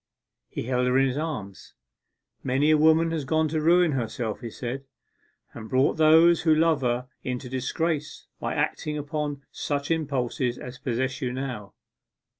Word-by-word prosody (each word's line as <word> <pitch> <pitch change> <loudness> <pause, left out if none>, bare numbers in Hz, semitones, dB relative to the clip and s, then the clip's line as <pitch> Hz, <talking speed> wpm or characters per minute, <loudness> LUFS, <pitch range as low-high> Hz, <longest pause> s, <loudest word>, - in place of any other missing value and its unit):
He - - -4
held 125 +1 0
her 125 +1 +3
in 135 0 +4
his 130 - -3
arms. 110 - -6 0.7
'Many 135 +4 +2
a 155 - +5
woman 160 +1 +4
has 160 -3 -2
gone 160 +3 +1
to 155 0 -1
ruin 170 +1 +4
herself,' 120 -4 -3
he 120 - -5
said, 125 +4 -5 0.7
'and 110 -1 -9
brought 130 +4 +2
those 160 +2 +6
who 160 -2 +4
love 160 -2 +3
her 125 0 -1 0.2
into 125 0 -4
disgrace, 150 +4 -2
by - - -3
acting 150 0 -1
upon 145 -1 -3
such 145 +1 -3
impulses 130 -5 -1
as 125 0 -9
possess 130 +2 -2
you 125 -2 -1
now. 125 -6 -5
135 Hz, 160 wpm, -26 LUFS, 125-155 Hz, 0.7 s, those